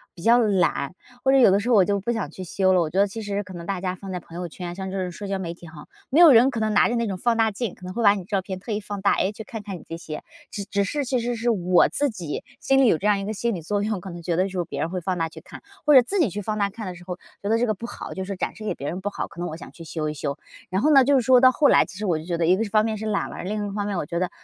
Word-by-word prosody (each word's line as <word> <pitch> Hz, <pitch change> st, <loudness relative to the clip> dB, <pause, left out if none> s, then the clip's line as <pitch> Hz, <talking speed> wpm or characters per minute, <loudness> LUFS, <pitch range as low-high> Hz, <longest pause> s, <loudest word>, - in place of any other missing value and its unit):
比 170 Hz, -, -11 dB
较 235 Hz, +2 st, +6 dB
懒， 180 Hz, -, +1 dB, 0.3 s
或 265 Hz, -, +4 dB
者 270 Hz, -, +5 dB
有 240 Hz, -7 st, +7 dB
的 195 Hz, -, +4 dB
时 225 Hz, +4 st, -3 dB
候 240 Hz, -, +5 dB
我 195 Hz, -3 st, +6 dB
就 200 Hz, +1 st, 0 dB
不 205 Hz, +5 st, -2 dB
想 205 Hz, -10 st, -3 dB
去 185 Hz, -, -8 dB
修 190 Hz, +1 st, +1 dB
了。 180 Hz, -, +4 dB
我 155 Hz, -, -1 dB
觉 185 Hz, +5 st, -1 dB
得 200 Hz, -, +6 dB
其 220 Hz, +3 st, -7 dB
实 205 Hz, 0 st, -3 dB
可 185 Hz, -1 st, -11 dB
能 170 Hz, +1 st, -8 dB
大 195 Hz, -2 st, -2 dB
家 185 Hz, 0 st, -2 dB
放 190 Hz, +1 st, -8 dB
在 180 Hz, -, -3 dB
朋 170 Hz, 0 st, -14 dB
友 175 Hz, 0 st, -4 dB
圈， 175 Hz, +1 st, -7 dB
像 190 Hz, +1 st, -5 dB
这 195 Hz, -, -4 dB
种 180 Hz, -1 st, -3 dB
社 200 Hz, +4 st, -7 dB
交 195 Hz, 0 st, -1 dB
媒 170 Hz, -3 st, -4 dB
体 175 Hz, -1 st, -13 dB
吼， 155 Hz, -2 st, -12 dB, 0.2 s
没 290 Hz, -, +3 dB
有 335 Hz, -4 st, +10 dB
人 245 Hz, +3 st, +7 dB
可 240 Hz, -, -3 dB
能 215 Hz, -1 st, 0 dB
拿 205 Hz, -, +4 dB
着 240 Hz, -, -1 dB
那 235 Hz, 0 st, 0 dB
种 200 Hz, -3 st, -2 dB
放 230 Hz, +5 st, +1 dB
大 225 Hz, -1 st, +3 dB
镜， 215 Hz, -1 st, -4 dB
可 180 Hz, -, -13 dB
能 185 Hz, -, -6 dB
会 235 Hz, -, -2 dB
把 200 Hz, -, +7 dB
你 200 Hz, -, -4 dB
的 -, -, -12 dB
照 195 Hz, 0 st, -1 dB
片 190 Hz, 0 st, -6 dB
特 210 Hz, +4 st, -7 dB
意 210 Hz, -, 0 dB
放 205 Hz, -1 st, -6 dB
大， 200 Hz, -, +4 dB
诶， 195 Hz, -, +1 dB
去 220 Hz, -, -9 dB
看 225 Hz, -3 st, -7 dB
看 200 Hz, -3 st, -6 dB
你 -, -, -14 dB
这 165 Hz, -, -6 dB
些。 155 Hz, -2 st, -7 dB, 0.3 s
只 200 Hz, -, -5 dB
只 200 Hz, -1 st, 0 dB
是 285 Hz, +8 st, -2 dB
其 255 Hz, 0 st, 0 dB
实 240 Hz, +1 st, -2 dB
是 235 Hz, +1 st, +1 dB
我 180 Hz, -4 st, +4 dB
自 290 Hz, 0 st, +1 dB
己 175 Hz, -, -5 dB, 0.2 s
心 270 Hz, 0 st, +3 dB
里 260 Hz, -, +5 dB
有 170 Hz, -, +4 dB
这 195 Hz, -, -7 dB
样 205 Hz, -1 st, +3 dB
一 195 Hz, -, -4 dB
个 215 Hz, -, -3 dB
心 235 Hz, +3 st, -1 dB
理 175 Hz, -, -5 dB
作 205 Hz, +5 st, -1 dB
用， 210 Hz, -3 st, -2 dB
可 190 Hz, -, -8 dB
能 170 Hz, -1 st, -8 dB
觉 170 Hz, 0 st, -1 dB
得 185 Hz, -, +2 dB
就 -, -, -7 dB
是 180 Hz, -2 st, -3 dB
别 -, -, -6 dB
人 165 Hz, -, -1 dB
会 185 Hz, +1 st, -3 dB
放 185 Hz, +2 st, -2 dB
大 165 Hz, 0 st, 0 dB
去 -, -, -12 dB
看， -, -, -12 dB, 0.2 s
或 295 Hz, -, +5 dB
者 260 Hz, -, +10 dB
自 385 Hz, +12 st, 0 dB
己 305 Hz, -, +3 dB
去 205 Hz, -, -4 dB
放 215 Hz, +1 st, -3 dB
大 200 Hz, -1 st, 0 dB
看 220 Hz, 0 st, -7 dB
的 180 Hz, -, -6 dB
时 175 Hz, -, -13 dB
候 180 Hz, -1 st, -5 dB, 0.3 s
觉 200 Hz, -, -2 dB
得 225 Hz, -, +3 dB
这 245 Hz, -, +1 dB
个 215 Hz, -, 0 dB
不 230 Hz, -, -7 dB
好， -, -, -7 dB
就 190 Hz, -, -4 dB
说 195 Hz, +1 st, -4 dB
展 -, -, -3 dB
示 220 Hz, -, -10 dB
给 -, -, -1 dB
别 140 Hz, -, -6 dB
人 180 Hz, -, -3 dB
不 200 Hz, +2 st, -3 dB
好， -, -, -4 dB
可 170 Hz, -, -13 dB
能 175 Hz, -, -2 dB
我 155 Hz, -, -6 dB
想 -, -, -11 dB
去 165 Hz, -, -12 dB
修 155 Hz, -1 st, -3 dB
一 -, -, -3 dB
修。 140 Hz, 0 st, -4 dB, 0.3 s
然 190 Hz, +3 st, +1 dB
后 305 Hz, -, +4 dB
呢， 275 Hz, -2 st, +7 dB
就 285 Hz, -, +3 dB
是 -, -, +1 dB
说 250 Hz, +1 st, +5 dB
到 255 Hz, 0 st, +7 dB
后 290 Hz, +3 st, +3 dB
来 -, -, +5 dB
其 200 Hz, -1 st, -11 dB
实 210 Hz, -, -2 dB
我 170 Hz, -4 st, +2 dB
就 155 Hz, -, -8 dB
觉 175 Hz, 0 st, -2 dB
得 165 Hz, -, +2 dB
一 185 Hz, +2 st, +5 dB
个 220 Hz, -, 0 dB
方 215 Hz, 0 st, +2 dB
面 220 Hz, -1 st, -1 dB
是 215 Hz, -, -6 dB
懒 210 Hz, -2 st, -1 dB
了， -, -, -7 dB
另 205 Hz, +2 st, -3 dB
一 -, -, -5 dB
方 205 Hz, -1 st, -1 dB
面 205 Hz, -2 st, -2 dB
我 170 Hz, -, -2 dB
觉 170 Hz, -, -4 dB
得， 180 Hz, 0 st, 0 dB
200 Hz, 405 characters per minute, -24 LUFS, 180-225 Hz, 0.3 s, 有